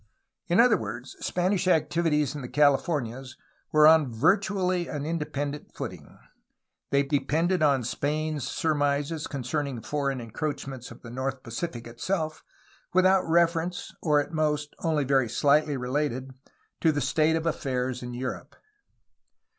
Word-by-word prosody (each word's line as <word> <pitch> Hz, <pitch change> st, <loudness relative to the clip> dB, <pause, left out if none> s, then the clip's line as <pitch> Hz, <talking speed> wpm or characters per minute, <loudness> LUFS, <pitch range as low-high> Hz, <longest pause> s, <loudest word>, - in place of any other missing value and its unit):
In 175 Hz, -, +3 dB
other 240 Hz, 0 st, +6 dB
words, 115 Hz, +4 st, -6 dB
Spanish 185 Hz, +1 st, 0 dB
activities 155 Hz, -3 st, +2 dB
in 145 Hz, -, -6 dB
the 125 Hz, -, -7 dB
Cahfornias 135 Hz, -3 st, +1 dB, 0.3 s
were 155 Hz, 0 st, +6 dB
on 155 Hz, -4 st, +6 dB
virtually 185 Hz, -, +1 dB
an 145 Hz, -1 st, -4 dB
independent 150 Hz, -2 st, -4 dB
footing; -, -, -7 dB, 0.7 s
they 140 Hz, 0 st, +3 dB
depended 155 Hz, +5 st, +1 dB
on 140 Hz, -4 st, +3 dB
Spain's 150 Hz, +2 st, -2 dB
surmises 145 Hz, 0 st, 0 dB
concerning 140 Hz, -1 st, -3 dB
foreign 140 Hz, +2 st, -2 dB
en 115 Hz, -2 st, -9 dB
croachments 135 Hz, -3 st, -4 dB
in -, -, -11 dB
the 115 Hz, -, -9 dB
north 130 Hz, +1 st, -3 dB
Pacific 120 Hz, +1 st, -5 dB
itself, 155 Hz, +7 st, -3 dB, 0.5 s
without 185 Hz, +1 st, +5 dB
reference 170 Hz, +1 st, +1 dB
(or 150 Hz, -3 st, +3 dB
at 145 Hz, -, -3 dB
most 150 Hz, -2 st, 0 dB
only 155 Hz, -3 st, +1 dB
very 135 Hz, -3 st, +2 dB
slightly 145 Hz, +3 st, +3 dB
related) 130 Hz, 0 st, -2 dB, 0.5 s
to 160 Hz, -, +4 dB
the 145 Hz, -, -1 dB
state 155 Hz, +4 st, +2 dB
of 165 Hz, 0 st, -2 dB
affairs 130 Hz, -5 st, -1 dB
in 125 Hz, 0 st, -6 dB
Europe. 130 Hz, +1 st, -5 dB
145 Hz, 135 wpm, -27 LUFS, 130-160 Hz, 0.7 s, other